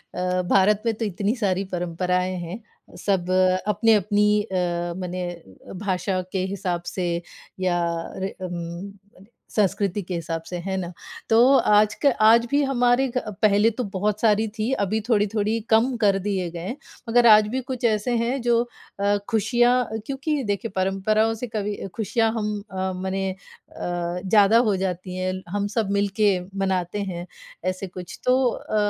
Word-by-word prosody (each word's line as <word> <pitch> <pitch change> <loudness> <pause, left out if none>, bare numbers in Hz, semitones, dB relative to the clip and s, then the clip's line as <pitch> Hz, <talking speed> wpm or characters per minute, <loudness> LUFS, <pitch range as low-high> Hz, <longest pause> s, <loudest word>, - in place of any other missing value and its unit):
अ, 180 0 0
भारत 200 +2 +4
में 230 - +2
तो 225 +1 -3
इतनी 205 +3 -1
सारी 195 -5 0
परंपराएँ 180 +1 -1
हैं। 175 +6 -6 0.4
सब 185 -3 +1 0.4
अपनी-अपनी 210 -1 +3
अ, 175 -3 -2
मने 180 0 -4 0.6
भाषा 185 -1 -1
के 190 -1 -1
हिसाब 180 -3 -3
से, 180 -2 -1 0.5
या 180 -2 +1 0.4
रे 190 +1 -4
उम 175 +2 -6 0.6
संस्कृति 200 -1 +1
के 180 - -6
हिसाब 165 -1 -3
से, 180 - -5
है 190 +2 -3
ना? 180 -2 -4 0.4
तो 225 - +4 0.2
आज 210 0 +4
का - - +8
आज 230 +2 +6
भी 285 - +3
हमारे 250 -1 +2
अ, 220 - -3
पहले 210 +1 +5
तो 250 - +1
बहुत 210 +2 0
सारी 220 0 +3
थी, 220 +3 -3
अभी 205 -2 0
थोड़ी-थोड़ी 215 0 +1
कम 230 +4 +3
कर 205 -3 +3
दिए 190 -4 -1
गए। 175 +8 -5 0.3
मगर 240 +1 +5
आज 215 -1 +7
भी 260 - 0
कुछ 255 -1 -4
ऐसे 225 +2 +1
हैं, 240 +3 -1
जो 235 -1 +3 0.4
अ, 200 +1 +2
खुशियाँ 240 +1 +2
क्योंकि 275 +2 -2
देखिए 205 +1 -2
परंपराओं 195 +4 +1
से 225 +3 -5
कभी 210 -2 -3 0.2
खुशियाँ 225 +1 +1
हम 210 -1 -2
अ, 190 0 -2
मने 190 +1 -2
अ, 175 -2 -6
ज़्यादा 205 +2 +5
हो 205 - +2
जाती 185 -1 -3
हैं। 185 0 -1 0.2
हम 205 +2 -1
सब 220 -3 +1
मिलके 200 +1 +2 0.3
मनाते 190 0 -1
हैं 175 -2 -5 0.5
ऐसे 185 +1 -6
कुछ, 180 -1 -9
तो 255 +1 +4
अ, 215 - -5
205 Hz, 155 wpm, -24 LUFS, 185-225 Hz, 0.6 s, का